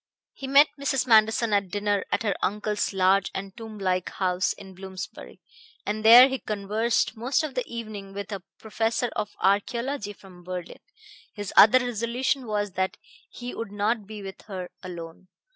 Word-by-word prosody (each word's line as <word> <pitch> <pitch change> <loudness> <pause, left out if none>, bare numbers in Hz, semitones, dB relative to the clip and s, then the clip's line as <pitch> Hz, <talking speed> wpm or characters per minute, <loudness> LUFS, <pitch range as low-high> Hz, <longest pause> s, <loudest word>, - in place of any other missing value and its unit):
He 270 - -7
met 280 +2 +6
Mrs. 270 -2 0
Manderson 220 -1 +4
at 200 -2 +1
dinner 205 0 0
at - - 0
her 205 -3 +1
uncle's 210 +1 -1
large 190 0 +3
and 195 0 -6
tomb 225 -2 -9
like 185 -2 -1
house 185 -1 0
in 190 -1 -12
Bloomsbury, 190 0 -9 0.5
and 215 +1 -2
there 240 +4 +10
he 265 -1 -3
conversed 215 +3 -1
most 255 +7 0
of 305 -3 -4
the 250 -1 -1
evening 215 -4 -7
with 200 +2 -6
a 200 -2 -4 0.2
professor 225 +2 -1
of 210 - -3
archaeology 205 +4 0
from 185 -3 -16
Berlin. 180 -1 -6 0.6
His 205 -2 -5
other 215 +5 +8
resolution 245 +2 -1
was 205 -1 -1
that 190 +1 -2 0.3
he 245 0 -7
would 225 -3 -6
not 205 +1 -1
be 210 -1 -8
with 195 -1 -8
her 185 -3 -6
alone. 170 0 -9
210 Hz, 165 wpm, -26 LUFS, 195-235 Hz, 0.6 s, there